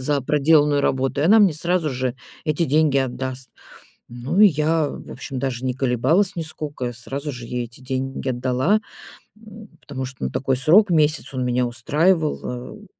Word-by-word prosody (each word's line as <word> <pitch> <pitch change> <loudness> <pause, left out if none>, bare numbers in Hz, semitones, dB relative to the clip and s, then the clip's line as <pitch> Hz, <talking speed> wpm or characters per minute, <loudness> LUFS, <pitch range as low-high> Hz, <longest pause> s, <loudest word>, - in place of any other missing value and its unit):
за 140 +2 0
проделанную 150 0 +3
работу. 135 +1 0
И - - +1
она 215 +6 +6
мне 200 -6 +5
сразу 170 0 -1
же 130 -1 -2 0.3
эти 155 +1 0
деньги 150 -1 +2
отдаст. 130 0 -4 0.6
Ну, 125 +10 -3
и 210 - +9
я, 155 -1 +1
в - - -9
общем, 135 0 -7
даже 130 -2 -3
не 130 - 0
колебалась 135 - +1
нисколько. 150 -6 -5
Сразу 140 +5 -6
же 120 -2 -8
ей 125 0 -3
эти 120 +2 -14
деньги 130 +1 -3
отдала, 130 - +1 0.6
м, 215 -1 -13
потому 130 -2 -6
что, 130 - -9
ну, 65 - -1
такой 135 0 0
срок- 185 +9 +5
месяц- 155 -3 +1
он 130 -1 -2
меня 125 0 +1
устраивал. 145 0 -1
Э, - - -15
140 Hz, 170 wpm, -22 LUFS, 130-160 Hz, 0.6 s, и